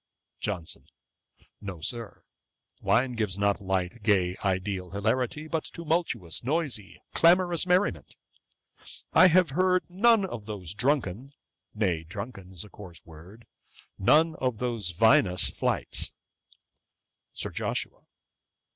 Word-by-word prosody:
JOHNSON. 90 -6 -4 0.7
'No, 95 -4 -7
Sir; 115 +7 -5 0.6
wine 125 +3 +2
gives 105 -5 -1
not 100 0 +1
light, 95 +3 -2
gay, 95 -4 +2
ideal 95 -1 -1
hilarity; 120 - -1
but 160 0 -2
tumultuous, 160 - -2
noisy, 135 - -2
clamorous 175 0 +4
merriment. 185 +3 +1 1.0
I 185 - +8
have 180 -3 +4
heard 185 +4 +2
none 205 +3 +4
of 115 - -7
those 100 -5 -5
drunken, 130 0 -1 0.4
nay, 90 -7 0
drunken 100 +2 -8
is 90 -3 -7
a 105 - -14
coarse 90 -5 -12
word, 85 +8 -14 0.5
none 160 +11 +4
of 125 -4 -1
those 115 -5 -2
vinous 90 -1 +4
flights.' - - -1 1.2
SIR - - -2
JOSHUA. - - -3
110 Hz, 110 wpm, -27 LUFS, 95-155 Hz, 1.2 s, I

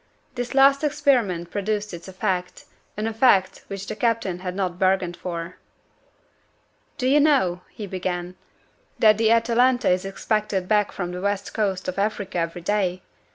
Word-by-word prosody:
This 245 +1 -4
last 275 +1 +5
experiment 250 - +1
produced 210 0 -2
its 170 +1 -8
effect 185 -1 -3 0.3
an 210 - -2
effect 220 -4 +2
which 195 0 -6
the 215 - -5
captain 225 -6 0
had 180 0 -5
not 185 -2 -2
bargained 185 -2 +1
for. 170 0 -6 1.4
"Do 255 -3 -1
you 285 +3 +5
know," 260 - +3
he 215 - -8
began, 180 -1 -4 0.6
"that 215 -1 +5
the 225 -1 +3
Atalanta 235 +1 +3
is 180 0 +1
expected 195 -1 -2
back 210 0 +2
from 180 -2 -4
the 180 0 -6
West 200 0 -2
Coast 195 -4 -1
of 185 +1 -3
Africa 205 -3 -1
every 170 +1 -3
day? 185 -2 0
200 Hz, 155 wpm, -23 LUFS, 180-225 Hz, 1.4 s, last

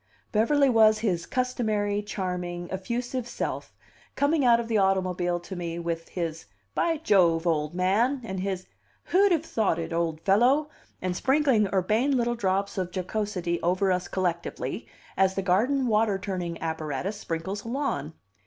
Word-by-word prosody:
Beverly 275 +7 +3
was 220 -3 +5
his 185 -6 -1
customary, 215 -5 0
charming, 180 -4 -4
effusive 240 +6 -3
self, - - -4 0.4
coming 285 +1 +2
out 235 -2 +5
of 235 - -3
the 225 -2 +2
automobile 185 -2 +1
to 190 +2 -8
me 170 -1 -4
with 170 -1 -4
his 165 -3 -4 0.3
"By 330 - +1
Jove, 180 - +3
old 155 -1 0
man," 215 +10 +2
and 190 -4 -4
his 190 -1 -3 0.5
"Who'd 395 +2 +5
have 325 -2 +2
thought 215 - 0
it, 165 0 -4
old 165 -2 -1
fellow?" 255 +10 +3 0.3
and 185 -1 -1
sprinkling 265 -4 +3
urbane 215 +9 +2
little 240 0 +1
drops 200 -3 -1
of 180 -1 -2
jocosity 185 -2 -2
over 185 +3 +2
us 180 0 0
collectively, 175 -3 -3 0.3
as 190 0 +2
the 195 - -1
garden 240 +9 +2
water 215 -3 +2
turning 185 -4 -4
apparatus 160 +4 -3
sprinkles 190 +3 -4
a - - -9
lawn. 235 - -2
195 Hz, 155 wpm, -27 LUFS, 175-235 Hz, 0.5 s, was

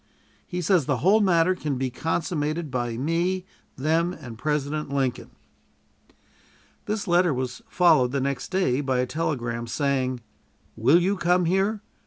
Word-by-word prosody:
He 180 -1 -3
says 170 -5 +2
the 140 - +1
whole 210 +4 +5
matter 180 -2 +3
can 150 -7 -3
be 130 0 -2
consummated 160 +1 -2
by 120 -2 -2
me, 170 +7 -1 0.3
them, 165 +5 +1
and 120 -9 -9
President 150 +3 -2
Lincoln. 135 -3 -1 1.6
This 210 0 -2
letter 175 -3 +3
was 125 0 -4
followed 155 -9 +4
the 140 - 0
next 135 -1 -2
day 165 -9 +1
by 135 -2 0
a 125 - +1
telegram, 120 -6 -3
saying: 130 -1 -1 0.5
"Will 135 +10 +4
you 195 +3 0
come 180 0 +2
here? 195 +4 +1
150 Hz, 145 wpm, -25 LUFS, 130-180 Hz, 1.6 s, whole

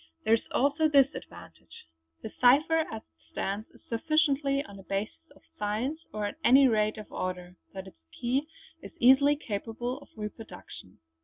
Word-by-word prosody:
There 220 - +4
is 230 - +3
also 290 +4 +2
this 275 -2 +4
advantage; 85 0 -12 0.4
the 220 - -6
cipher 305 +6 +4
as 220 0 -6
it - - -38
stands 200 +3 -4
is - - -21
sufficiently 280 +2 +1
on 200 -1 -12
a - - -12
basis 205 +12 -5
of - - -22 0.2
science 220 +9 -2
or 210 -1 -3
at 205 - -5
any 265 +2 +7
rate 215 -2 +1
of 215 - -10
order, 180 -1 -5 0.2
that 190 0 -6
its 80 - -15 0.2
key 260 +5 0 0.3
is - - -11
easily 270 +4 +6
capable 240 +1 -5
of 285 - -17
reproduction. 210 - -9
240 Hz, 165 wpm, -28 LUFS, 210-280 Hz, 0.4 s, any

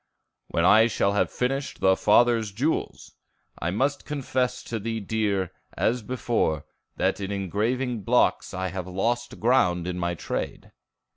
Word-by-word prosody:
"When 85 - 0
I 110 +4 +7
shall 100 -2 +1
have 100 - +2
finished 135 +3 -2
the 95 0 +4
Father's 115 +1 +3
jewels. 135 +11 -2 0.5
I 85 - -1
must 135 +10 0
confess 130 -4 -2
to 115 - -4
thee, 115 +2 -3
dear, 100 -3 -1 0.3
as 120 +2 +1
before, 110 - -1 0.3
that - - 0
in 100 0 -4
engraving 110 +5 -1
blocks - - +2
I 95 0 -3
have 90 0 -5
lost 120 +6 -2
ground 90 -8 +3
in 90 0 -3
my 85 0 -1
trade." - - -5
110 Hz, 145 wpm, -26 LUFS, 95-125 Hz, 0.5 s, I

